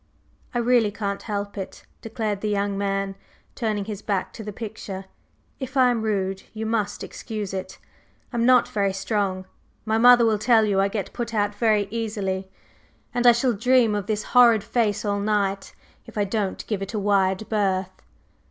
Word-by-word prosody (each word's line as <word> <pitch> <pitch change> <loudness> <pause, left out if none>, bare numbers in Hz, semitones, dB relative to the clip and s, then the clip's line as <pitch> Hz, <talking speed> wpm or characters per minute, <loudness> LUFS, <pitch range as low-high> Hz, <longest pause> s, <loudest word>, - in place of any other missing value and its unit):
"I - - +2
really 240 -2 +3
can't 200 -1 -4
help 205 -1 -4
it," 190 - -8 0.2
declared 215 -3 -3
the 215 - -1
young 200 -1 0
man, 195 0 -1 0.4
turning 215 -4 -2
his 210 -1 -6
back 195 -3 -2
to 220 - -8
the 210 - -5
picture. 205 -3 -7 0.5
"If 265 0 -5
I 255 -1 +5
am 235 -2 -1
rude, 195 -3 -1
you 220 +1 -3
must 215 -2 -1
excuse 215 -4 -6
it. 190 -1 -5 0.6
I'm 235 -1 +1
not 250 0 +5
very 200 -2 0
strong 195 -1 -1 0.4
my 220 0 +1
mother 245 0 +7
will 220 -2 +2
tell 225 0 +4
you 195 -2 +2
I 195 - +3
get 200 -2 -4
put 235 -1 -4
out 205 -1 +1
very 210 -2 +2
easily, 200 -4 -3 0.6
and 245 0 +2
I - - +11
shall 240 +1 +1
dream 235 +1 +3
of 205 -1 -2
this 215 -1 -1
horrid 235 -4 +6
face 215 -1 0
all 205 0 0
night 200 -1 -1 0.3
if - - -11
I 205 - +3
don't 200 -1 -2
give 210 -3 -3
it 195 +3 -5
a - - 0
wide 195 0 +1
berth." 190 -3 0
210 Hz, 180 wpm, -24 LUFS, 200-225 Hz, 0.6 s, I